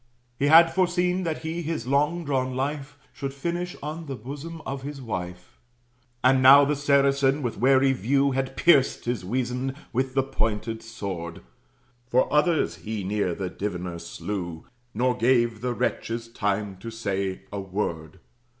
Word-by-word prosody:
He 140 - +2
had 165 +2 +7
foreseen 180 0 +1
that 160 -1 -3
he 165 +2 -3
his 160 -6 -3
long 150 +6 +1
drawn 130 -2 -1
life 145 +2 -3 0.2
Should 135 -1 -5
finish 175 +5 -3
on 155 +2 -5
the 135 - -4
bosom 145 +7 -7
of 135 0 -4
his 140 +1 -6
wife. 90 -7 -6 0.6
And 130 +1 +5
now 140 +2 +9
the 150 +1 +1
Saracen 140 0 +2
with 120 -5 -3
wary 135 +2 +4
view 135 +4 +2
Had 135 0 -2
pierced 140 -6 +4
his 120 -4 -2
weasand 125 +5 -2 0.2
with 130 +2 -1
the 135 - +3
pointed 115 -3 -2
sword. 95 -7 -6 0.6
Four 125 +3 +2
others 155 +2 +2
he 110 -2 -5
near 95 -2 -1
that 95 -2 -6
Diviner 90 -4 -3
slew, 85 -4 -5 0.3
Nor 125 +2 +2
gave 120 -2 +2
the 125 -1 -2
wretches 115 0 -2
time 100 -3 -2
to 115 +5 -7
say 100 -4 -3
a 100 - -4
word. 90 -5 -4
130 Hz, 155 wpm, -25 LUFS, 105-140 Hz, 0.6 s, now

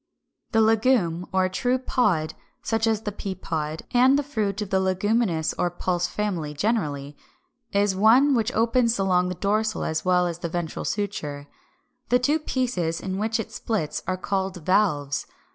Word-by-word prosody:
] - - -52
368. 225 - +4 0.4
=The - - +4
Legume= 170 +2 -5
or 185 -1 +2
true 245 +7 0
Pod, 210 -11 0 0.3
such 225 0 0
as 220 -1 +1
the 210 -2 -3
peapod 160 -6 -4
(Fig. - - -30
393), 245 - +3
and 265 +2 +6
the 290 - 0
fruit 215 -8 -2
of 200 - -10
the 190 - +3
Leguminous 190 -2 +1
or 175 - +2
Pulse 175 0 -1
family 175 -7 -3
generally, 145 -7 -1 0.6
is 200 -1 +2
one 240 +8 +5
which 235 -1 +1
opens 230 +1 +2
along 180 -2 +2
the 180 - -3
dorsal 215 +3 0
as 160 0 -2
well 180 -1 +3
as 170 -1 -3
the 170 - -4
ventral 170 -1 -4
suture. 150 -9 -3 0.6
The 245 - +5
two 285 +6 +1
pieces 235 - -1
into 190 0 -4
which 220 +1 0
it 225 - -4
splits 200 -10 -2
are 185 - -1
called 190 -3 -3
VALVES. 150 -8 +1
195 Hz, 180 wpm, -25 LUFS, 175-225 Hz, 0.6 s, and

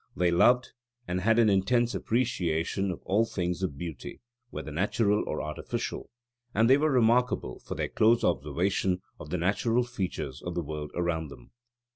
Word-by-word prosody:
They 90 -1 +2
loved 120 +8 +4 0.4
and 90 +1 -1
had 115 +3 +3
an 115 -2 +5
intense 115 +5 +2
appreciation 95 -5 0
of 90 - -5
all 105 +4 +2
things 90 -5 -2
of 85 -8 -2
beauty, 80 -4 -7 0.3
whether 75 - -6
natural 100 +5 +1
or 75 - -2
artificial; 75 0 -4 0.5
and 110 +3 +4
they 135 +3 +6
were 155 +2 +2
remarkable 125 - +2
for - - -7
their - - -2
close 115 +2 +3
observation 90 +6 0 0.2
of 75 - -9
the 90 - -1
natural 115 +7 +1
features 95 - -4
of 90 -1 -5
the 85 - -1
world 75 0 -5
around 85 -2 -1
them. 70 - -14
95 Hz, 165 wpm, -28 LUFS, 85-115 Hz, 0.5 s, they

